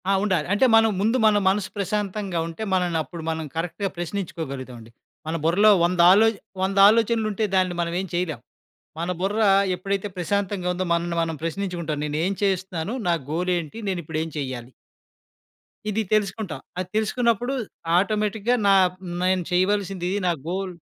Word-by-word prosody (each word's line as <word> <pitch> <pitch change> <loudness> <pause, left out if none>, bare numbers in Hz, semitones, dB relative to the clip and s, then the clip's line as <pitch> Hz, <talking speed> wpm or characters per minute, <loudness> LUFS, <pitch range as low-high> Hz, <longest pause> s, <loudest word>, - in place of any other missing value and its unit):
ఆ! - - +4
ఉండాలి. 185 -7 0
అంటే 205 +6 +4
మనం 225 0 +5
ముందు 225 +5 +2
మన 215 -1 +5
మనసు 195 0 0
ప్రశాంతంగా 200 -2 -2
ఉంటే, 165 +6 -6
మనల్ని 175 -3 +1
అప్పుడు 165 +3 -9
మనం 160 0 -3
కరెక్ట్‌గా 180 +4 -2
ప్రశ్నించుకోగలుగుతాం 160 -8 -5
అండి. 115 0 -14 0.4
మన 160 - -2
బుర్రలో 195 +7 +5
వందదాలోచ 185 +6 +5 0.3
వంద 195 +1 0
ఆలోచనలుంటే 220 -1 +1
దాన్ని 185 -1 +2
మనం 170 0 -2
ఏం 190 - -3
చేయలేం. 175 -6 -1 0.6
మన 170 +2 -2
బుర్ర 205 +4 0 0.3
ఎప్పుడైతే 195 +2 -2
ప్రశాంతంగా 190 +1 -1
ఉందో, 185 +1 -2
మనల్ని 170 0 -1
మనం 165 -1 -3
ప్రశ్నించుకుంటాం. 170 -3 -3
నేనేం 155 +6 -1
చేస్తున్నాను? 190 +1 -1
నా - - +4 0.2
గోలేంటి? 175 +1 -1
నేనిప్పుడేం 165 -3 -3
చేయాలి? 130 -3 -5 1.2
ఇది 215 +1 0
తెలుసుకుంటా. 200 -5 -1 0.2
అది 185 -1 -2
తెలుసుకున్నప్పుడు 235 +2 +1 0.4
ఆటోమేటిక్‌గా 210 +3 +1
నా 200 - +6 0.5
నేను 185 0 +2
చేయవలసిందిది. 190 0 0
నా - - +3 0.2
గోల్ 185 +1 -3
185 Hz, 140 wpm, -24 LUFS, 170-205 Hz, 1.2 s, నా